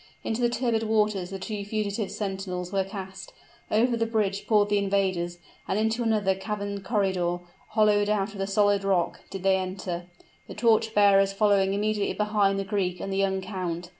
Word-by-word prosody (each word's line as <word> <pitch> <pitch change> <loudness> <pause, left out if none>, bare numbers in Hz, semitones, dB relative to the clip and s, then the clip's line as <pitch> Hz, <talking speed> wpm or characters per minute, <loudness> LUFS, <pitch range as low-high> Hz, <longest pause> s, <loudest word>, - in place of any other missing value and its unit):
Into 225 +2 -2
the 240 - +3
turbid 235 -2 0
waters 210 -4 +1
the 195 - -5
two 205 +1 -5
fugitive 205 0 -2
sentinels 190 -3 -4
were 195 -1 +2
cast: 190 -1 -8 0.4
over 235 +3 +2
the 230 0 0
bridge 205 -3 -1
poured 210 -2 +3
the 205 0 +3
invaders, 190 -3 0 0.3
and 190 - 0
into 220 +2 0
another 215 -4 +2
caverned 200 0 -4
corridor, 190 -5 0 0.4
hollowed 210 -1 +4
out 205 -1 0
of 200 - -10
the 195 - -1
solid 205 0 +2
rock, 190 -3 +1
did 190 -1 -7
they 190 0 +4
enter, 185 -2 -4 0.4
the - - -9
torch 225 0 +2
bearers 195 -1 +5
following 195 -1 +3
immediately 210 0 0
behind 210 -2 +2
the 195 - -1
Greek 190 -3 -1
and 195 - -4
the - - -1
young 190 -1 +1
count. 180 -3 -4
200 Hz, 180 wpm, -26 LUFS, 190-215 Hz, 0.4 s, bearers